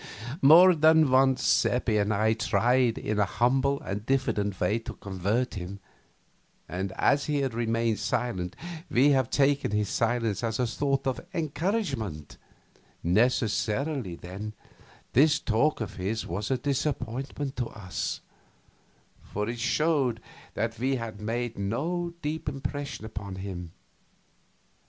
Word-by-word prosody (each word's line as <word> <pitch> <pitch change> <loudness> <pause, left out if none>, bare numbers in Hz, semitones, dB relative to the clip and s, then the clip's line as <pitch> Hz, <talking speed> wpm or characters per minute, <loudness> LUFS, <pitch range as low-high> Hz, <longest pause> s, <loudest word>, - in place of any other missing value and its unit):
More 175 +6 +8
than 160 -2 +5
once 130 0 +4
Seppi 120 -3 +2
and 105 +1 +1
I 110 +1 +2
had 110 0 0
tried 120 +4 +2
in 105 0 -2
a 105 - +4
humble 130 +7 +1
and 100 +2 -4
diffident 105 -7 0
way 105 +6 +1
to 115 - -7
convert 100 +6 -1
him, 95 0 -6 0.9
and 95 +2 -3
as 140 0 +2
he 145 -2 0
had 135 -3 -1
remained 115 -1 0
silent 95 -8 -2 0.3
we 135 +4 +4
had 130 -4 +2
taken 140 0 +2
his 105 -1 0
silence 115 -2 0
as 115 0 -1
a 125 - +2
sort 135 +3 -1
of 130 -1 -1
encouragement; 150 - -2 0.7
necessarily, 115 - +1
then, 95 +5 -7 0.6
this 150 +3 +5
talk 120 +6 +1
of 105 -1 -5
his 100 +4 -2
was 100 +5 -3
a 130 - +2
disappointment 135 0 -2
to 120 -2 -1
us, 95 -6 -4 1.0
for 105 +1 -4
it 120 0 -4
showed 130 -1 +1 0.4
that 115 +1 -2
we 135 +2 +1
had 115 -4 -6
made 115 +1 -3
no 170 - -2
deep 150 0 -2
impression 140 -3 -5
upon 100 -3 -6
him. 95 -3 -6
120 Hz, 135 wpm, -28 LUFS, 105-140 Hz, 1.0 s, More